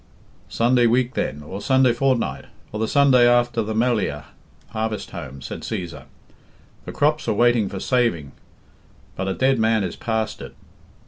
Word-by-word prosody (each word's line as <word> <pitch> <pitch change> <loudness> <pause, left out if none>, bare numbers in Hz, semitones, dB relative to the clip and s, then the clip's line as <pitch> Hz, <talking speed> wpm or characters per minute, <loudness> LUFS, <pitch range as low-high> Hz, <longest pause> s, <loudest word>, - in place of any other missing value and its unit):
"Sunday 120 +1 +3
week, 125 +2 +1
then, 75 +3 -3
or 95 +7 -7
Sunday 130 0 +3
fortnight, 130 -1 0 0.3
or 105 - -5
the 110 - 0
Sunday 130 -3 +5
after 120 -1 +2
the 110 0 -3
Melliah 110 -10 0 0.5
(harvest 110 -2 -4
home)," 70 +1 -8
said - - -7
Cæsar; 85 -3 -6 0.8
"the - - -6
crops 150 +1 0
are - - +2
waiting 120 -2 +3
for 95 - -6
saving, 115 - 0 0.8
but 95 - -3
a 95 - -1
dead 130 -1 +2
man 110 -1 +2
is 90 - -4
past 110 -1 -3
it. - - -10
115 Hz, 155 wpm, -22 LUFS, 105-125 Hz, 0.8 s, Sunday